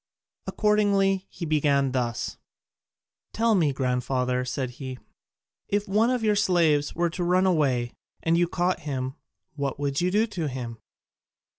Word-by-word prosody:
Accordingly 200 Hz, -2 st, +2 dB
he 175 Hz, -, -6 dB
began 145 Hz, -3 st, +2 dB
thus: 120 Hz, -3 st, -2 dB, 1.0 s
"Tell 230 Hz, 0 st, +2 dB
me, 165 Hz, -8 st, +3 dB
grandfather," 125 Hz, -1 st, 0 dB
said 130 Hz, 0 st, -3 dB
he, 130 Hz, 0 st, -7 dB, 0.7 s
"if 205 Hz, +1 st, -1 dB
one 215 Hz, +4 st, +3 dB
of 250 Hz, -2 st, 0 dB
your 210 Hz, -1 st, +3 dB
slaves 165 Hz, -7 st, +2 dB
were 170 Hz, 0 st, +1 dB
to 175 Hz, -, -3 dB
run 180 Hz, +2 st, +3 dB
away, 135 Hz, -9 st, +1 dB, 0.3 s
and 165 Hz, 0 st, +3 dB
you 175 Hz, 0 st, +3 dB
caught 180 Hz, +1 st, 0 dB
him, 130 Hz, -3 st, -3 dB, 0.4 s
what 140 Hz, -2 st, -3 dB
would 140 Hz, 0 st, -1 dB
you 180 Hz, -, +2 dB
do 210 Hz, +4 st, +3 dB
to 185 Hz, -8 st, -4 dB
him?" 120 Hz, -4 st, -6 dB
155 Hz, 145 wpm, -26 LUFS, 130-190 Hz, 1.0 s, me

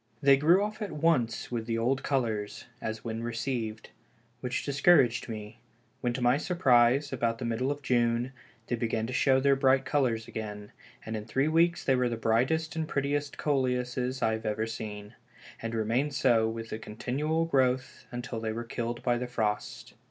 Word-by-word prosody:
They 140 Hz, -1 st, +6 dB
grew 165 Hz, +8 st, +4 dB
off 215 Hz, +2 st, -4 dB
at 210 Hz, -, -3 dB
once 150 Hz, -9 st, +1 dB
with 115 Hz, -2 st, -3 dB
the 115 Hz, -1 st, 0 dB
old 125 Hz, +4 st, +1 dB
colors 110 Hz, -7 st, -2 dB, 0.2 s
(as 110 Hz, 0 st, -4 dB
when 115 Hz, -1 st, -4 dB
received), 115 Hz, -1 st, -3 dB, 0.5 s
which 125 Hz, +1 st, -3 dB
discouraged 135 Hz, -4 st, +4 dB
me 110 Hz, -2 st, -4 dB
again, 105 Hz, +2 st, -14 dB, 0.5 s
when 120 Hz, -1 st, 0 dB
to 125 Hz, -, -3 dB
my 120 Hz, +3 st, +4 dB
surprise, 140 Hz, -4 st, +3 dB
about 115 Hz, -2 st, 0 dB
the 120 Hz, -, -5 dB
middle 115 Hz, +3 st, -1 dB
of 145 Hz, 0 st, -3 dB
June, 120 Hz, 0 st, +1 dB, 0.3 s
they 120 Hz, -, -1 dB
began 110 Hz, -1 st, -1 dB
to 125 Hz, -, -5 dB
show 130 Hz, +1 st, +4 dB
their 140 Hz, +1 st, +4 dB
bright 135 Hz, 0 st, +3 dB
colors 120 Hz, -6 st, 0 dB
again, 105 Hz, -1 st, -6 dB, 0.3 s
and 110 Hz, -, -4 dB
in 105 Hz, -1 st, -5 dB
three 135 Hz, +6 st, +1 dB
weeks 170 Hz, +2 st, +3 dB
they 135 Hz, -, +3 dB
were 125 Hz, -1 st, +1 dB
the 115 Hz, -, -3 dB
brightest 130 Hz, +9 st, +1 dB
and 160 Hz, -1 st, -2 dB
prettiest 145 Hz, 0 st, -1 dB
Coleuses 130 Hz, -2 st, -1 dB
I 110 Hz, -, +3 dB
have 110 Hz, 0 st, -4 dB
ever 110 Hz, +1 st, 0 dB
seen, 105 Hz, -1 st, -7 dB, 0.5 s
and 115 Hz, 0 st, -3 dB
remained 120 Hz, +6 st, 0 dB
so 115 Hz, -4 st, +3 dB
with 115 Hz, 0 st, -6 dB
a 110 Hz, -, -4 dB
continual 145 Hz, +10 st, -1 dB
growth 130 Hz, -4 st, 0 dB
until 120 Hz, -1 st, -5 dB
they 110 Hz, -1 st, -2 dB
were 115 Hz, +2 st, -4 dB
killed 120 Hz, 0 st, -4 dB
by 120 Hz, -1 st, +1 dB
the 125 Hz, -, -3 dB
frost. 105 Hz, -4 st, -3 dB
125 Hz, 185 wpm, -29 LUFS, 115-135 Hz, 0.5 s, They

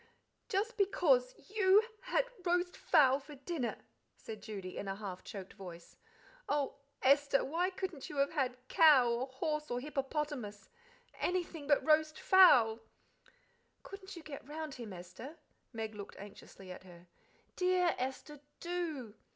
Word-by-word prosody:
"Just 445 Hz, +3 st, -1 dB
because 280 Hz, -, +3 dB
you 405 Hz, 0 st, +4 dB, 0.2 s
had -, -, +1 dB, 0.2 s
roast 355 Hz, 0 st, +1 dB
fowl 275 Hz, -5 st, +4 dB
for 285 Hz, +1 st, -12 dB
dinner," 275 Hz, -2 st, -3 dB, 0.4 s
said 215 Hz, -1 st, -9 dB
Judy, 195 Hz, -4 st, -7 dB
in 200 Hz, -, -5 dB
a 195 Hz, -, -2 dB
half 195 Hz, -3 st, -7 dB
choked 195 Hz, -2 st, -8 dB
voice. 175 Hz, -4 st, -11 dB, 0.5 s
"Oh, 285 Hz, -1 st, 0 dB, 0.3 s
Esther, 280 Hz, +1 st, +4 dB
why 340 Hz, +6 st, 0 dB
couldn't 365 Hz, -6 st, -5 dB
you 290 Hz, -, -7 dB
have 275 Hz, 0 st, +2 dB
had 260 Hz, -5 st, -1 dB
cow, 300 Hz, -8 st, +6 dB
or 240 Hz, +3 st, -1 dB
horse, 300 Hz, +3 st, -3 dB
or 245 Hz, -, -1 dB
hippopotamus 275 Hz, -5 st, -4 dB, 0.5 s
anything 345 Hz, -5 st, -2 dB
but 290 Hz, -1 st, +3 dB
roast 310 Hz, 0 st, +3 dB
fowl?" 245 Hz, -13 st, +6 dB, 1.0 s
"Couldn't 390 Hz, -1 st, -10 dB
you 335 Hz, -, -10 dB
get 280 Hz, -3 st, -9 dB
round 310 Hz, -1 st, -5 dB
him, 235 Hz, -5 st, -8 dB
Esther?" 185 Hz, -, -9 dB, 0.3 s
Meg 220 Hz, -2 st, -5 dB
looked 205 Hz, -1 st, -9 dB
anxiously 195 Hz, -2 st, -11 dB
at 180 Hz, -, -9 dB
her. 175 Hz, -2 st, -15 dB, 0.5 s
"Dear 360 Hz, -1 st, +2 dB
Esther, 265 Hz, +3 st, -4 dB, 0.2 s
do!" 330 Hz, -10 st, -4 dB
280 Hz, 140 wpm, -34 LUFS, 225-340 Hz, 1.0 s, cow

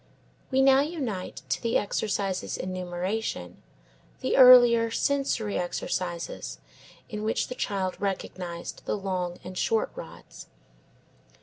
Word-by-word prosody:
We 265 Hz, 0 st, +3 dB
now 270 Hz, 0 st, +6 dB
unite 270 Hz, -, -3 dB
to -, -, 0 dB
the 230 Hz, 0 st, +2 dB
exercises 200 Hz, -2 st, -2 dB
in 185 Hz, 0 st, -4 dB
numeration 180 Hz, -, -4 dB, 0.6 s
the 260 Hz, -, 0 dB
earlier, 245 Hz, -3 st, +8 dB
sensory 245 Hz, -4 st, 0 dB
exercises 175 Hz, -1 st, -3 dB, 0.5 s
in 210 Hz, -1 st, -5 dB
which 220 Hz, +1 st, -1 dB
the -, -, -3 dB
child 195 Hz, -6 st, -2 dB
recognised 180 Hz, -3 st, -4 dB
the -, -, -1 dB
long 180 Hz, -3 st, -3 dB
and 185 Hz, -, -8 dB
short 455 Hz, -, +1 dB
rods. -, -, -11 dB
205 Hz, 115 wpm, -27 LUFS, 185-250 Hz, 0.6 s, earlier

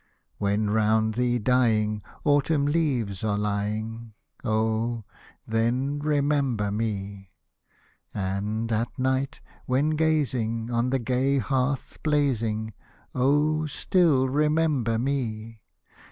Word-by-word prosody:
When, 105 Hz, +1 st, +1 dB
around 110 Hz, +1 st, +2 dB
thee 120 Hz, +1 st, +1 dB
dying. 110 Hz, -3 st, +2 dB, 0.2 s
Autumn 145 Hz, 0 st, +2 dB
leaves 130 Hz, -, 0 dB
are 105 Hz, -2 st, 0 dB
lying, 105 Hz, +2 st, -3 dB, 0.3 s
Oh! 110 Hz, 0 st, 0 dB, 0.4 s
then 125 Hz, +6 st, 0 dB
remember 140 Hz, -7 st, +1 dB
me. 100 Hz, -2 st, -4 dB, 0.8 s
And, 105 Hz, +4 st, -2 dB
at 115 Hz, +2 st, -1 dB
night, 130 Hz, +1 st, -1 dB, 0.3 s
when 135 Hz, +4 st, +2 dB
gazing 130 Hz, -8 st, 0 dB
On 120 Hz, +1 st, +1 dB
the 135 Hz, -, +2 dB
gay 130 Hz, +3 st, +1 dB
hearth 135 Hz, 0 st, -1 dB
blazing. 115 Hz, -8 st, 0 dB, 0.4 s
Oh! 150 Hz, +4 st, +2 dB
still 150 Hz, -3 st, +2 dB
remember 150 Hz, -4 st, +1 dB
me. 115 Hz, -4 st, -3 dB
120 Hz, 95 wpm, -26 LUFS, 110-140 Hz, 0.8 s, around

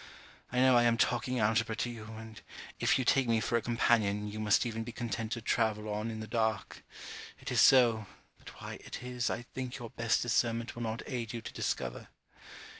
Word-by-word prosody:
I 125 Hz, -, -3 dB
know 130 Hz, -1 st, +6 dB
I 120 Hz, -, +6 dB
am 115 Hz, -1 st, +3 dB
talking 125 Hz, +2 st, +1 dB
algebra 110 Hz, +1 st, +2 dB
to 120 Hz, -, -2 dB
you, 110 Hz, -2 st, -9 dB
and 110 Hz, -1 st, -10 dB, 0.4 s
if -, -, +3 dB
you 130 Hz, -, -1 dB
take 135 Hz, 0 st, +3 dB
me 115 Hz, -1 st, +3 dB
for 120 Hz, -, -1 dB
a 115 Hz, -, +2 dB
companion, 110 Hz, -3 st, +1 dB
you 105 Hz, +1 st, -6 dB
must 105 Hz, 0 st, +3 dB
even 115 Hz, -1 st, -3 dB
be 120 Hz, -, -7 dB
content 115 Hz, -1 st, -4 dB
to 115 Hz, -, -5 dB
travel 110 Hz, -3 st, 0 dB
on 105 Hz, +2 st, -2 dB
in 110 Hz, -1 st, -5 dB
the -, -, -5 dB
dark. 110 Hz, -2 st, -1 dB, 0.6 s
It -, -, -6 dB
is -, -, +4 dB
so, 115 Hz, -5 st, +5 dB, 0.3 s
but -, -, -12 dB
why -, -, -7 dB
it -, -, -7 dB
is, 125 Hz, -1 st, -2 dB
I -, -, -3 dB
think 130 Hz, -1 st, -4 dB
your 120 Hz, -3 st, -8 dB
best 115 Hz, -1 st, +1 dB
discernment 115 Hz, 0 st, 0 dB
will 120 Hz, -, -6 dB
not 115 Hz, 0 st, -3 dB
aid 120 Hz, -4 st, -4 dB
you 115 Hz, -, -4 dB
to -, -, -7 dB
discover. -, -, -3 dB
115 Hz, 210 wpm, -32 LUFS, 110-120 Hz, 0.6 s, know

